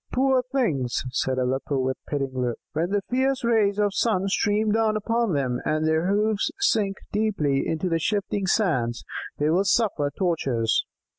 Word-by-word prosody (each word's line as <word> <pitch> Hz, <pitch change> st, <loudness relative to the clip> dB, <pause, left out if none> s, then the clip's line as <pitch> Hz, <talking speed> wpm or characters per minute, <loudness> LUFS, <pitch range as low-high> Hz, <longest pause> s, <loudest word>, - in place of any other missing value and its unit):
"Poor 260 Hz, 0 st, +3 dB
things," 225 Hz, -, -1 dB
said 130 Hz, 0 st, -1 dB
Aleppo 130 Hz, +2 st, -1 dB
with 130 Hz, 0 st, 0 dB
a -, -, -23 dB
pitying 135 Hz, -3 st, -2 dB
look. 120 Hz, -2 st, -1 dB, 0.2 s
"When 165 Hz, +3 st, 0 dB
the 200 Hz, 0 st, 0 dB
fierce 260 Hz, +1 st, 0 dB
rays 215 Hz, -4 st, +2 dB
of 205 Hz, -1 st, +2 dB
the -, -, -11 dB
sun 195 Hz, -5 st, +1 dB
stream 210 Hz, +2 st, +1 dB
down 220 Hz, 0 st, +2 dB
upon 230 Hz, -1 st, 0 dB
them, 130 Hz, -4 st, 0 dB
and 155 Hz, +1 st, 0 dB
their 160 Hz, +2 st, +1 dB
hoofs 210 Hz, +1 st, +1 dB
sink 210 Hz, -, +1 dB
deeply 195 Hz, -11 st, 0 dB
into 160 Hz, +3 st, -1 dB
the 165 Hz, -2 st, +1 dB
shifting 200 Hz, +1 st, -1 dB
sands, 130 Hz, -, +1 dB, 0.3 s
they 150 Hz, +1 st, +1 dB
will 185 Hz, +4 st, +3 dB
suffer 190 Hz, -8 st, +1 dB
tortures. 135 Hz, -, 0 dB
190 Hz, 170 wpm, -25 LUFS, 140-215 Hz, 0.3 s, Poor